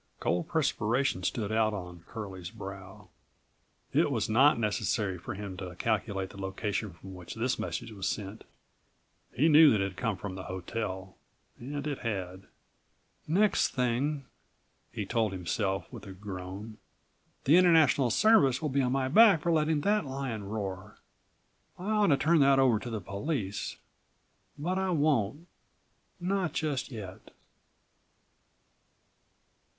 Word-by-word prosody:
Cold 90 0 0
perspiration 125 - 0
stood 105 +2 -2
out 110 -1 +2
on 90 -3 -8
Curlie's 95 -6 -7
brow.54 100 -1 -7
It - - +1
was - - 0
not 130 +7 +5
necessary 105 -3 -1
for - - -6
him 100 -1 -6
to 90 -1 -7
calculate 100 -2 -1
the 100 - -10
location 100 +1 -3
from 95 +3 -11
which 90 -2 -9
this 120 +3 -1
message 115 - -4
was 100 -4 -4
sent. 105 0 -4 0.9
He 145 +6 +2
knew 155 0 +8
that 110 - +3
it - - +1
had 90 - -19
come 115 -6 -1
from 100 0 -6
the 95 0 -7
hotel. 95 0 -5 0.4
And 140 +3 -5
it 145 -3 -3
had. 95 -4 -4 0.8
"Next 195 +7 +2
thing," 130 +3 0 0.7
he 105 -3 -4
told 110 -1 0
himself 95 +2 -2
with - - -9
a 95 - -8
groan, 95 +2 -8 0.6
"the 150 +6 +6
International 160 -7 +5
Service 140 - +4
will 155 - -2
be 140 +1 +1
on 125 -1 0
my 135 -1 +1
back 200 +2 +6
for 170 - +1
letting 155 -1 +2
that 210 +5 +2
lion 130 -6 -4
roar. 100 -1 -5 0.8
I 190 +4 -4
ought 210 -1 +3
to 140 - +4
turn 160 +4 +3
that 140 -1 +5
over 130 -5 +4
to 120 - -7
the 110 -3 -4
police; 100 - -3 0.8
but 180 +6 -1
I 190 0 0
won't, 150 - +1 0.7
not 185 -1 -1
just 150 -4 -2
yet." 95 -5 -9
115 Hz, 145 wpm, -30 LUFS, 95-145 Hz, 0.9 s, knew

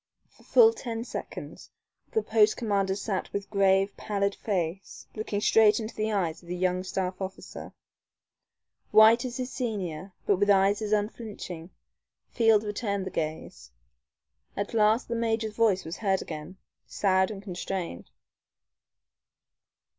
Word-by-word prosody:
For - - -24
full 455 -2 +6
ten 230 - -5
seconds - - -8 0.4
the 440 - +1
post 220 -1 +3
commander 200 -4 0
sat 200 -1 -3
with 200 0 -5
grave, 195 0 +3
pallid 200 -1 -1
face, 190 -3 -3
looking 215 -2 -3
straight 215 0 +5
into 220 0 -5
the 215 0 -2
eyes 170 -6 -1
of 170 - -16
his 180 0 -4
young 185 0 +1
staff 185 0 -3
officer. 190 0 -7 1.2
White 225 +3 +6
as 245 0 -4
his 255 0 -4
senior, 195 - -4
but 200 - +3
with 205 +2 +1
eyes 200 +1 +4
as 215 -1 -3
unflinching, 205 -5 -3 0.6
Field 225 -3 +4
returned 205 -2 -2
the 190 - -5
gaze. 155 - -5 0.9
At 200 +3 -3
last 220 +1 +3
the 235 - -3
major's 225 -2 -1
voice 215 -5 +2
was 160 - -6
heard 195 -3 0
again, 160 +4 -8 0.3
sad 190 -1 +2
and 200 -2 -7
constrained. 180 - -5
200 Hz, 140 wpm, -28 LUFS, 190-220 Hz, 1.2 s, full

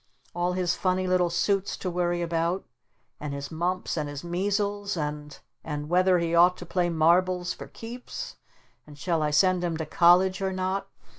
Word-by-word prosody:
All 175 +1 0
his 180 -2 +1
funny 185 0 0
little 180 -1 +2
suits 195 +3 0
to 185 - -3
worry 175 0 0
about 170 +2 -1 0.5
and 145 -1 -4
his 140 0 -6
mumps 175 +2 -2
and 150 -2 -2
his 145 +1 -7
measles 200 +2 -1
and 150 -1 -4 0.3
and 150 -1 -5
whether 185 +1 +4
he 170 -1 -1
ought 175 +2 +5
to 175 - -8
play 175 0 0
marbles 175 +2 +2
'for - - -9
keeps' 245 - -8 0.5
and 145 -1 -13
shall 165 +2 0
I 150 - +1
send 180 +4 +3
him 170 -2 -1
to 160 - -3
college 180 +4 +4
or 190 0 0
not? 190 +1 -2
175 Hz, 175 wpm, -27 LUFS, 165-185 Hz, 0.5 s, ought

